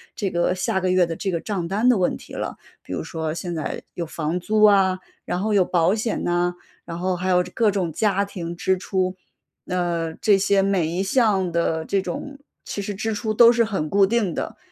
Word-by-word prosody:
这 200 - -1
个 175 +1 +1
下 185 +1 0
个 185 -1 0
月 185 -1 +4
的 165 - -4
这 195 - -2
个 170 -3 -1
账 190 -6 -3
单 215 +7 +2
的 245 - +4
问 180 - +1
题 - - -12
了。 - - -4 0.3
比 - - -8
如 - - -3
说 160 -2 -3
现 175 +1 -4
在 155 -2 -4
有 170 - -3
房 160 +2 -3
租 215 +4 +1
啊， 195 -3 +5 0.3
然 180 - -2
后 215 +1 0
有 190 -3 +4
保 175 +1 +2
险 220 +1 -2
呐， 175 0 0 0.3
然 165 - -6
后 180 +1 -1
还 185 - -3
有 180 -1 +4
这 180 - -11
各 225 +1 +2
种 190 -5 -1
家 200 +2 +1
庭 175 -4 -6
支 190 +2 +1
出， 185 0 -1 0.5
呃， 170 -3 -1
这 205 -2 +3
些 195 0 +3
每 195 -4 +1
一 175 +3 -2
项 195 -3 +2
的 165 -1 0
这 195 - 0
种 280 +6 -6 0.3
其 200 - -4
实 205 +1 -4
支 220 +3 -2
出 215 +1 -2
都 235 +2 +8
是 235 -1 +3
很 195 -9 -2
固 200 +2 +4
定 205 -4 0
的， - - -4
185 Hz, 240 characters per minute, -23 LUFS, 175-205 Hz, 0.5 s, 都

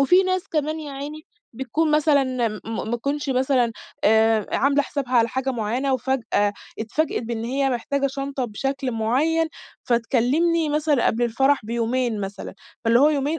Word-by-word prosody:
وفي 355 +7 +5
ناس 370 -1 -1
كمان 310 0 -1
يا 290 -2 -7
عيني 295 +3 -7 0.3
بتكون 305 +6 -1
مثلًا 300 -2 +4 0.4
ما 225 +1 -3
تكونش 280 +3 -2
مثلًا 255 -2 +2 0.3
آآ، 220 -1 +4
عاملة 280 +2 +3
حسابها 275 -3 -4
على 230 -1 +4
حاجة 265 +2 -2
معيّنة 245 +4 -1
وفجأة 235 -5 0 0.3
اتفاجأت 240 +9 -1
بإن 230 -1 -4
هي 270 +3 0
محتاجة 275 +3 -1
شنطة 275 -1 -3
بشكل 270 +4 -3
معيّن، 295 +9 +1 0.4
فتكلمني 275 +8 +2
مثلًا 295 -3 +1
قبل 240 +2 +1
الفرح 270 +4 +2
بيومين 235 -1 -1
مثلًا، 195 0 -6 0.3
فاللي 230 +2 +4
هو 290 - +6
يومين 295 +2 0
265 Hz, 150 wpm, -23 LUFS, 235-290 Hz, 0.4 s, هو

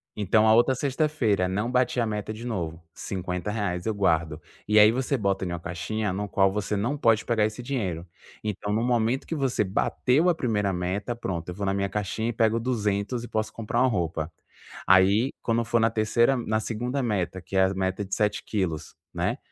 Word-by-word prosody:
Então 105 +2 +3
a 110 - +6
outra 120 +3 +4
sexta 140 +4 0
feira 105 -11 +1
não 105 +6 -1
bati 125 0 +1
a 115 - +2
meta 105 0 -3
de 115 +3 -8
novo 85 -8 -4
R$50 90 0 -3
eu 110 - 0
guardo. 85 -5 0 0.3
E 105 - +3
aí 105 +1 +8
você 130 +3 -1
bota 100 -3 0
em - - -3
uma 85 -1 -3
caixinha 90 +5 -3
no 105 +2 -3
qual 95 -1 +3
você 105 +1 -2
não 120 +9 -1
pode 115 -4 +3
pegar 110 -3 +2
esse 110 +3 -4
dinheiro. 95 -11 -3 0.4
Então 105 0 -3
no 115 +2 +1
momento 120 +1 +1
que 165 - -4
você 135 -6 +1
bateu 125 - +1
a 170 - +3
1º 105 - 0
meta, 95 +6 -2
pronto, 90 -7 -4
eu 90 - -5
vou 100 - -3
na 95 - +1
minha 100 0 0
caixinha 105 +3 -2
e - - -2
pego 115 0 +2
200 115 -1 -1
e - - -6
posso 110 -1 -2
comprar 115 -2 -2
uma 130 - +5
roupa. 85 -6 -2 0.5
Aí 100 +7 +5
quando 115 0 +1
for 115 0 +1
na 115 - +4
3º 115 +4 +2
na 110 -2 -1
2º 120 +5 -2
meta 95 -6 -1
que 95 +3 -8
é 95 - +5
a 95 - 0
meta 95 +1 -1
de 95 - -8
7 105 0 0
quilos, 90 -7 -3 0.2
né, - - -1
105 Hz, 210 wpm, -26 LUFS, 95-120 Hz, 0.5 s, aí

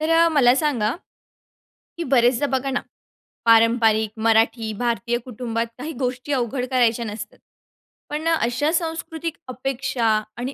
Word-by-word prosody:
तर 310 - -1
अ, 330 +1 +5
मला 270 -6 +4
सांगा, 255 -7 0 1.0
की 340 - -2
बरेचदा 245 +2 +3
बघा 270 +1 -3
ना, 250 - -1 0.6
पारंपरिक 225 -1 +4 0.2
मराठी 225 0 +2
भारतीय 240 0 0
कुटुंबात 230 -2 -3
काही 295 +6 -5
गोष्टी 255 +2 -3
अवघड 250 0 -1
करायच्या 235 -2 +2
नसतात. 210 0 -7 0.7
पण 305 +2 -3
अशा 295 -1 +1
सांस्कृतिक 325 -1 -3
अपेक्षा 255 -1 -3 0.3
आणि 255 +3 -4
250 Hz, 125 wpm, -22 LUFS, 230-290 Hz, 1.0 s, अ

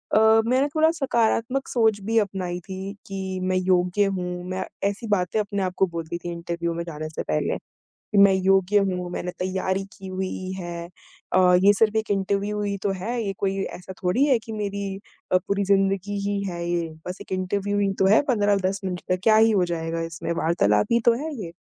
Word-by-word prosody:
अ, - - +7 0.3
मैंने 260 +4 +3
थोड़ा 315 +1 +5
सकारात्मक 260 -3 0
सोच 220 -4 +2
भी 225 +3 -1
अपनाई 185 -4 -2
थी 190 +1 -5
कि 190 -1 -4
मैं 185 0 0
योग्य 185 +2 +2
हूँ 180 0 -4
मैं 185 0 -2 0.3
ऐसी 205 +3 -6
बातें 205 0 +1
अपने 200 -1 -2
आप 185 -1 -2
को 190 - +4
बोलती 170 -1 -5
थी 175 0 -6
इंटरव्यू 170 0 -3
में 170 0 -3
जाने 155 -2 -6
से 155 - -5
पहले, 75 - -1 0.7
"मैं 200 -1 +6
योग्य 190 +1 +3
हूँ, 180 -2 -1
मैंने 180 0 -3
तैयारी 190 +1 -1
की 190 - -10
हुई 185 0 -4
है, 170 -1 -5 0.5
अ, 185 - +5 0.2
ये 205 - +7
सिर्फ़ 215 +1 +2
एक 220 -1 -1
इंटरव्यू 200 +1 0
ही 200 -1 -2
तो 200 - +1
है 235 +4 -2
ये 195 - -2
कोई 195 0 0 0.2
ऐसा 185 +1 -9
थोड़ी 185 +10 +3
है 270 -4 +4
कि 225 - -10
मेरी 200 0 -3 0.5
अ, - - +7
पूरी 200 +2 -1
ज़िंदगी 195 0 +1
ही 200 -1 -1
है 170 -1 -5
ये। 170 -1 -1 0.2
बस 180 +1 -4
एक - - -12
इंटरव्यू 200 +2 -1
ही 200 -1 +2
तो 190 - +4
है - - +6
15-10 200 -4 +1
मिनट 180 -1 -3
तक, 185 0 +1
क्या 220 - +5
ही 225 +1 +6
हो 190 -4 +3
जाएगा 165 0 -3
इसमें, 165 0 -4
वार्तालाप 105 - +2
ही 235 - +4
तो 235 - +6
है 315 -1 -4
ये।" 165 - -7
190 Hz, 200 wpm, -24 LUFS, 180-205 Hz, 0.7 s, अ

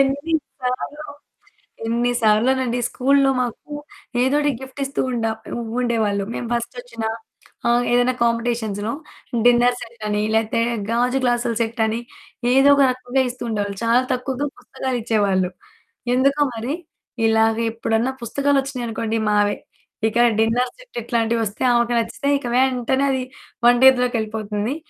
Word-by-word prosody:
ఎన్ని 280 +4 +1 0.3
సార్లో, 255 +4 -3 0.8
ఎన్ని 235 +2 +1
సార్లోనండి 245 +3 +2
స్కూల్లో 275 +1 +3
మాకు. 250 +4 -5 0.5
ఏదోటి 290 +3 +2
గిఫ్ట్ 265 +1 -8
ఇస్తూ 275 - -2
ఉండ 235 -2 -1 0.3
ఉ - - -3 0.2
ఉండేవాళ్ళు, 220 -5 0
మేము 240 - -4
బస్టొచ్చినా, 235 -1 -4 0.6
ఆహ్, 240 +1 +3
ఏదైనా 245 +1 +3
కాంపిటీషన్స్‌లో, 230 -2 -1 0.5
డిన్నర్ 245 0 +5
సెట్ 230 -1 -10
అని, 210 0 0
లేతే 225 +1 +1 0.3
గాజు 250 +3 +1
గ్లాసుల 240 -1 +1
సెట్ 230 0 -2
అని, 220 +1 -1 0.5
ఏదోక 280 +2 +6
రకంగా 255 +1 -1
ఇస్తూ 245 0 -7
ఉండేవాళ్ళు. 205 -2 -2
చాలా 235 +2 +4
తక్కువగా 260 +3 -2
పుస్తకాలు 260 -2 -4
ఇచ్చేవాళ్ళు. 200 -5 +1 0.6
ఎందుకో 275 +3 +2
మరి, 235 +5 -3 0.5
ఇలాగా 225 0 +3
ఎప్పుడన్నా 230 +2 0
పుస్తకాలొచ్చినాయి 275 0 0
అనుకోండి, 225 0 -2
మావే. 205 0 +2 0.5
ఇక 230 - -1 0.2
డిన్నర్ 240 +3 +2
సెట్ - - -14
ఇట్లాంటివొస్తే 230 -2 -1
ఆమెకు 240 0 +2
నచ్చితే, 230 +5 -3
ఇక 275 - -10
వెంటనే 260 +1 +2
అది 260 -1 -1 0.4
వంటింట్లోకెళ్ళిపోతుంది. 240 -3 +2
240 Hz, 120 wpm, -21 LUFS, 225-260 Hz, 0.8 s, ఏదోక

